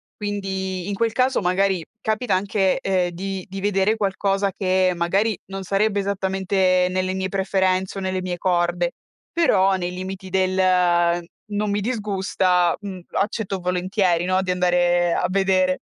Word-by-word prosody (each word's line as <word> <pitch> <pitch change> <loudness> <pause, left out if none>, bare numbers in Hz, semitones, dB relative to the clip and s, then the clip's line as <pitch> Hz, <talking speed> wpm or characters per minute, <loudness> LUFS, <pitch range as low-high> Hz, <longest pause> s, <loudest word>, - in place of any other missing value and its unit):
Quindi 190 -3 -3
in 205 - -2
quel 230 +2 +1
caso 255 +2 +2
magari 185 -1 +1 0.2
capita 220 0 0
anche, 195 0 +1
ehm, 185 -2 +1
di 190 +2 -5
di 195 +1 -6
vedere 200 +1 +2
qualcosa 195 -1 0
che 185 -1 +1
magari 195 +6 +1
non 195 0 -6
sarebbe 200 +2 +1
esattamente 190 -2 +1
nelle 185 0 -1
mie 190 0 -2
preferenze 190 -1 0
o - - -3
nelle 185 0 -2
mie 180 -1 -3
corde, 175 -1 0 0.4
però 195 - +3
nei 180 -1 -2
limiti 185 +1 -6
del 185 0 +1 0.9
"Non 210 0 -1
mi 205 +1 0
disgusta", 190 -5 +1
mh, 195 -3 -7
accetto 200 -1 -1
volentieri 180 -1 0
no, 185 +1 +1
di 185 - -1
andare 175 -1 +2
a - - 0
vedere. 185 -1 +2
190 Hz, 145 wpm, -22 LUFS, 185-200 Hz, 0.9 s, però